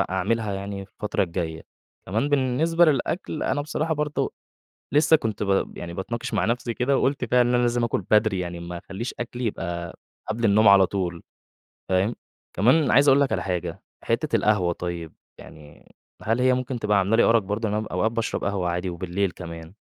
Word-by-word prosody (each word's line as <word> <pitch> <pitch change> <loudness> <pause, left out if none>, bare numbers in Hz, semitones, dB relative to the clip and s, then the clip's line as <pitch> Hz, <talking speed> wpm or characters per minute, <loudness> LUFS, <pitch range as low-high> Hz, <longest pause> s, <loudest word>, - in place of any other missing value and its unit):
أعملها 105 +3 0
يعني 100 0 -5
في - - -37
الفترة 105 - -1
الجاية. 85 -3 -3 0.4
كمان 110 +9 0
بالنسبة 145 +5 +3
للأكل، 155 +3 -1
أنا 145 - 0
بصراحة 155 +2 -1
برضه 150 0 -2 0.6
لسه 150 +2 +5
كنت 110 -8 -3
ب 100 -1 0
يعني 85 0 -6
باتناقش 110 +5 -4
مع 95 - +1
نفْسِي 120 +1 -1
كده 135 +2 +1
وقلت 135 -1 0
فعلًا 125 +1 +3
إن 125 - +1
أنا 125 - +3
لازم 120 0 +1
آكل 115 - -1
بدري، 105 -2 +3
يعني 85 -1 -5
ما 85 0 -6
أخليش 100 +7 -6
أكلي 120 +1 -4
يبقى 85 -4 -4 0.3
قبل 110 +2 -2
النوم 105 0 +5
على 100 -2 +7
طول، 90 -4 -3 0.7
فاهم، 95 +5 +1 0.4
كمان 130 - +4
عايز 140 +3 +5
أقول 135 +1 +6
لك 140 - +1
على - - 0
حاجة، 90 -1 -3 0.2
حتّة - - 0
القهوة 95 -5 +2
طيب، 85 -2 -5 0.3
يعني 75 -1 -15 0.3
هل 115 +3 0
هي 130 0 +4
ممكن 130 0 -3
تبقى 105 -2 +2
عاملة 100 +4 +2
لي 115 - +5
أرق 115 -1 +4
برضه؟ 105 +3 -2
إن 105 - -2
أنا 110 0 -2
أوقات 100 +6 0
باشرب 115 -1 -2
قهوة 95 -3 -1
عادي 90 +1 -2
وبالليل 90 +2 -2
كمان. 85 0 -9
105 Hz, 185 wpm, -24 LUFS, 90-125 Hz, 0.7 s, على